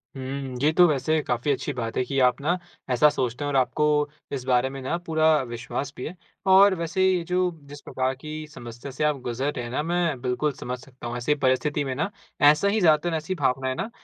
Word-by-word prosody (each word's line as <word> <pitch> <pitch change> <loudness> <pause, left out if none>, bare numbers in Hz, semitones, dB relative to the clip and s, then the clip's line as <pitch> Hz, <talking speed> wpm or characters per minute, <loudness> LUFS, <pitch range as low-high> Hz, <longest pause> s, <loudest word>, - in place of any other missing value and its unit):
हुँ। 135 -1 -5
ये 150 +2 +4
तो 175 +2 +6
वैसे 155 +1 +1
काफ़ी 125 +3 0
अच्छी 140 +1 -2
बात 115 -3 -4
है - - +2
कि 135 0 -1
आप 125 - -1
ना 170 +5 +1 0.3
ऐसा 130 +4 +5
सोचते 125 -2 -2
हैं - - -1
और 140 - -2
आपको 130 +4 +2 0.5
इस 135 -3 -3
बारे 125 0 +2
में 135 0 -7
ना 135 +6 -1
पूरा 160 -1 +1 0.2
विश्वास 125 +3 -5
भी 125 - -5
है। 175 - -8 0.4
और 195 0 +7
वैसे 170 +2 -1
ये 185 -2 +2
जो 180 - +2 0.3
जिस 145 0 -10
प्रकार 130 0 -1
की 155 +4 -9 0.2
समस्या 120 -2 -9
से 135 +4 -3
आप 150 -1 +2
गुज़र 125 +4 -2
रहे 125 - -4
हैं 120 - -7
ना 130 - 0
मैं 170 -5 0
बिल्कुल 130 +4 0
समझ 125 -1 -5
सकता 125 -2 -10
हूँ। 120 +1 -4
ऐसी 130 +5 +1
परिस्थिति 145 +2 +1
में 135 -2 -3
ना 155 +8 -1 0.4
ऐसा 150 +6 +1
ही 210 +2 +2
ज़्यादातर 165 0 +3
ऐसी 155 +4 -4
भावनाएँ 130 -3 0
ना 205 - -3
140 Hz, 225 wpm, -25 LUFS, 125-155 Hz, 0.5 s, और